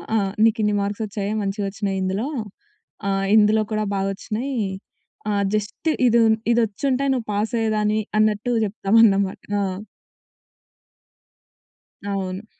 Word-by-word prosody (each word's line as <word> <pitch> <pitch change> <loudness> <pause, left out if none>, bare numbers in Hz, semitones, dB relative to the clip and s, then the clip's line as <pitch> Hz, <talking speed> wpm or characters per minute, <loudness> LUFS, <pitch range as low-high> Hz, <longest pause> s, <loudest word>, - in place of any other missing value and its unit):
ఆ! - - +4 0.3
నీకిన్ని 215 -2 +2
మార్క్స్ 205 +2 -2
వచ్చాయా? 205 0 -3
మంచిగొచ్చినాయి 195 0 -2
ఇందులో. 195 +7 -1 0.8
ఆహ్, 195 0 0
ఇందులో 215 +1 +4
కూడా 215 0 0
బాగొచ్చినాయి. 215 +7 -3 0.7
ఆహ్, 200 -1 +1
జస్ట్ 215 +9 -2 0.2
ఇదున్ 225 -2 +4 0.2
ఇదొచ్చింటే 245 +4 0
నువ్వు 245 -4 -3
పాసయ్యేదానివి. 215 0 0 0.2
అన్నట్టు 215 +2 +1
చెప్తామన్నమాట. 200 -1 +3 0.2
ఆ! - - +1 2.4
అవును. 195 0 -3
210 Hz, 95 wpm, -22 LUFS, 200-225 Hz, 2.4 s, ఆ